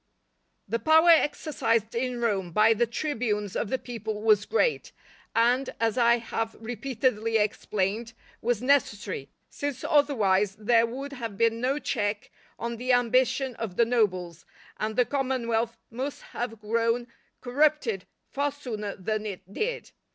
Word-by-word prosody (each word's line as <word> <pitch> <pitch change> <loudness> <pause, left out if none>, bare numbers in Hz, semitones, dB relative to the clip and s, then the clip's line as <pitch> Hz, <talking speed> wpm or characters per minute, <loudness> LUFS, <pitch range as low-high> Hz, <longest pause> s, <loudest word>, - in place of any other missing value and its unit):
_ - - -48 0.6
The 230 - -1
power 320 +4 +6
exercised 230 -8 +2
in 245 +1 -2
Rome 200 -7 0
by 215 +5 +5
the 235 +2 +1
tribunes 225 -6 -2
of 205 - -1
the 260 - 0
people 220 -4 -5
was 215 -2 +4
great, 465 +1 +1 0.4
and, 245 +3 +3
as 225 -2 +1
I 235 -1 +4
have 225 -1 -3
repeatedly 230 -1 -1
explained, 210 +1 -1 0.3
was 240 0 0
necessary, 205 - +1 0.2
since 285 -3 -4
otherwise 210 -10 +2
there 230 +2 +3
would 275 +4 -6
have 230 -6 -6
been 230 +1 +2
no 265 +3 +1
check 215 -5 -2 0.3
on 235 0 -4
the 250 +2 -1
ambition 255 +1 +2
of 215 -6 -5
the 235 - +4
nobles, 185 -8 0 0.3
and 215 0 -2
the 250 - +4
commonwealth 235 -4 -1
must 265 +5 -5
have 225 -2 -4
grown 230 +2 0 0.3
corrupted 260 -6 +1 0.2
far 285 +1 -1
sooner 220 -8 -5
than 215 +3 -3
it 190 -1 -8
did. 475 - -3
230 Hz, 145 wpm, -27 LUFS, 215-255 Hz, 0.6 s, power